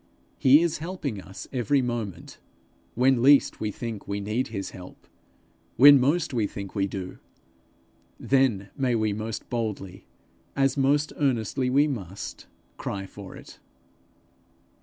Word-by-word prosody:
He 140 +5 +6
is 170 -3 -1
helping 155 - -4
us 95 +1 -10
every 135 +3 +2
moment, 110 -8 -5 0.6
when 130 0 +3
least 140 +2 +5
we 110 - -2
think 110 0 -6
we 100 0 -2
need 110 +6 -2
his 100 -4 -5
help; 90 -1 -12 0.7
when 140 +2 +9
most 145 +4 +1
we 110 -4 +1
think 100 -2 -8
we 100 -2 0
do, 95 -2 -7 1.0
then 125 -8 +1
may 130 -3 0
we 110 -2 0
most 110 +1 -5
boldly, 105 -6 -4 0.5
as 135 -1 +2
most 145 +2 +1
earnestly 130 -2 0
we 140 +3 +4
must, 100 - -6 0.3
cry 95 -1 -4
for 95 0 -11
it. - - -13
115 Hz, 135 wpm, -26 LUFS, 100-135 Hz, 1.0 s, when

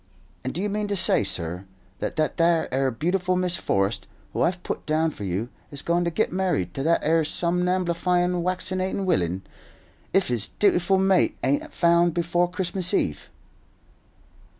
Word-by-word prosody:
And 130 - -2
do 170 +9 -3
you - - +1
mean 210 0 -2
to 205 - -1
say, 170 - +4
sur, 90 -1 -3 0.3
that - - -3
that 155 -1 0
'ere 160 -6 +2
beautiful 180 +8 0
Miss 180 -1 +1
Forrest, 100 - -1 0.3
who - - -1
I've 175 +1 0
put - - -5
down 155 +1 +1
for 105 - -7
you, 95 +6 -2 0.2
is 140 -1 -8
goin' 170 +1 +1
to - - +1
git 175 +3 -1
married 180 - 0
to - - -4
that 165 +4 +2
'ere 165 +2 +3
somnamblifyin' 180 +1 0
waccinatin' 185 +2 -1
willain, 95 - 0 0.7
if 195 -4 +2
his 120 -4 0
dutiful 195 -1 +3
mate 190 -1 +2
ain't 135 +3 +2
a - - -10
found 170 -1 +3
before 175 +1 +1
Christmas 180 0 -1
Eve?" 75 - -1
170 Hz, 165 wpm, -25 LUFS, 135-185 Hz, 0.7 s, say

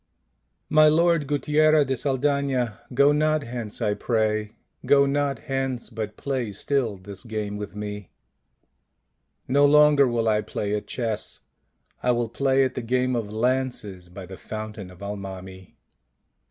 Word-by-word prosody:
My 155 0 +6
Lord 165 -1 +3
Guttiera 150 +1 +3
de 135 0 -1
Saldana, 135 -4 0
go 140 +3 +5
not 155 0 +2
hence 115 -2 -5
I 105 -1 +2
pray, 110 -1 -1 0.3
go 140 -1 +5
not 140 0 0
hence, 135 -3 -3
but 110 -2 -5
play 130 -6 -2
still 115 -1 -1
this 95 +3 -9
game 110 -3 -4
with 105 0 -6
me." 105 -2 -6 0.7
" 65 +1 -50
No 140 +3 +3
longer 145 -1 +6
will 115 -2 0
I 105 -1 +3
play 105 0 -3
at 105 - -3
chess; 115 -4 -3 0.6
I 125 - 0
will 120 -1 -1
play 135 +2 +2
at 130 - -1
the - - -4
game 125 +2 0
of 110 -3 -3
lances 110 -6 -2
by 90 +1 -9
the 95 +1 -10
fountain 110 -1 -7
of 90 +2 -13
Al 100 +1 -4
mami." 95 -1 -9
120 Hz, 155 wpm, -25 LUFS, 105-140 Hz, 0.7 s, My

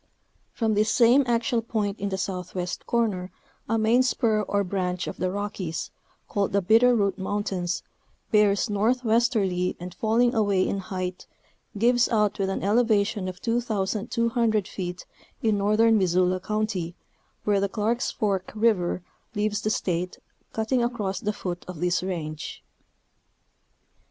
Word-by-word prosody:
From 225 -2 0
this 215 +1 +2
same 245 +4 +5
axial 235 0 +1
point 215 -3 -2
in 200 0 -2
the 190 - -2
southwest 180 -1 -4
corner 210 -6 0 0.4
a 225 - +2
main 225 +3 +4
spur 230 -4 +2
or 200 -1 0
branch 180 -2 -2
of - - -6
the 185 - 0
Rockies, 190 -4 -4 0.4
called 200 -2 -1
the 200 - +3
Bitter 230 +6 +5
Root 200 -2 +1
Mountains, 190 -2 -2 0.5
bears 210 0 +4
northwesterly 220 -4 +1
and 180 0 -7
falling 235 +4 +2
away 200 -4 +2
in 200 - -1
height, 185 -2 -5 0.5
gives 240 +3 +3
out 210 -3 +1
with 195 -1 +1
an 195 - -2
eleva 215 0 +3
tion 200 -3 -4
of 185 -1 -7
2,200 230 -1 0
feet 180 -3 -5 0.4
in 215 -2 +2
northern 215 +2 +4
Missoula 185 0 +2
County 195 -4 -2 0.5
where 205 -1 +2
the 200 0 0
Clarke's 225 +5 0
Fork 200 -5 -1
river 205 -6 +1 0.3
leaves 210 0 0
the 215 - 0
State, 180 -3 -1 0.3
cutting 225 +3 0
across 215 -5 -2
the 210 - -1
foot 180 -4 -5
of 180 -4 -7
this 180 +1 +1
range. 160 -5 -5
205 Hz, 140 wpm, -26 LUFS, 185-225 Hz, 0.5 s, same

